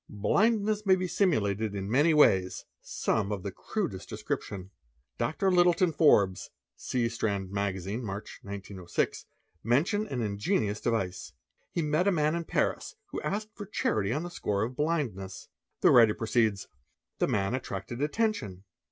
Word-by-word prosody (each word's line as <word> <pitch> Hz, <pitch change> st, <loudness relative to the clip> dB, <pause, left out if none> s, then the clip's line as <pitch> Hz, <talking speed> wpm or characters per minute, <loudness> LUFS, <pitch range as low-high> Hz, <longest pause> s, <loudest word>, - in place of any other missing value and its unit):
Blindness 210 Hz, -, +1 dB
may 190 Hz, -2 st, +5 dB
be 185 Hz, 0 st, -2 dB
simulated 110 Hz, -, +1 dB
in 95 Hz, -1 st, -3 dB
many 145 Hz, +9 st, +4 dB
ways, 95 Hz, -12 st, +3 dB, 0.2 s
some 105 Hz, -2 st, -1 dB
of 100 Hz, -3 st, -3 dB
the -, -, -3 dB
crudest -, -, -4 dB
description. 95 Hz, -1 st, -4 dB, 0.5 s
Dr. 160 Hz, +11 st, +1 dB
Litton 175 Hz, 0 st, +4 dB
Forbes 100 Hz, -, +3 dB, 0.3 s
(see 120 Hz, -2 st, -1 dB
Strand 100 Hz, -4 st, -2 dB
Magazine, 100 Hz, +3 st, -2 dB
March, 100 Hz, 0 st, -6 dB
1906) 100 Hz, -3 st, -4 dB, 0.4 s
mention 165 Hz, -, +1 dB
an 125 Hz, -, -2 dB
ingenious 105 Hz, -, -1 dB
device. 95 Hz, -6 st, -2 dB, 0.4 s
He 170 Hz, -, -1 dB
met 155 Hz, +5 st, +1 dB
a -, -, +5 dB
man 155 Hz, -3 st, +2 dB
in 170 Hz, 0 st, -2 dB
Paris -, -, -1 dB, 0.2 s
who -, -, -4 dB
asked 210 Hz, +2 st, -3 dB
for 205 Hz, -, -8 dB
charity 105 Hz, -, 0 dB
on 150 Hz, +6 st, -1 dB
the 175 Hz, -, -6 dB
score 100 Hz, -10 st, -1 dB
of 120 Hz, +3 st, -4 dB
blindness. 135 Hz, -, -2 dB, 0.3 s
The -, -, +6 dB
writer 115 Hz, -3 st, +6 dB
proceeds; 110 Hz, -3 st, +1 dB, 0.3 s
' -, -, -56 dB
'The -, -, +2 dB
man. 100 Hz, +1 st, 0 dB
attracted 120 Hz, -1 st, -4 dB
attention. 150 Hz, -, -1 dB
115 Hz, 150 wpm, -29 LUFS, 100-170 Hz, 0.5 s, The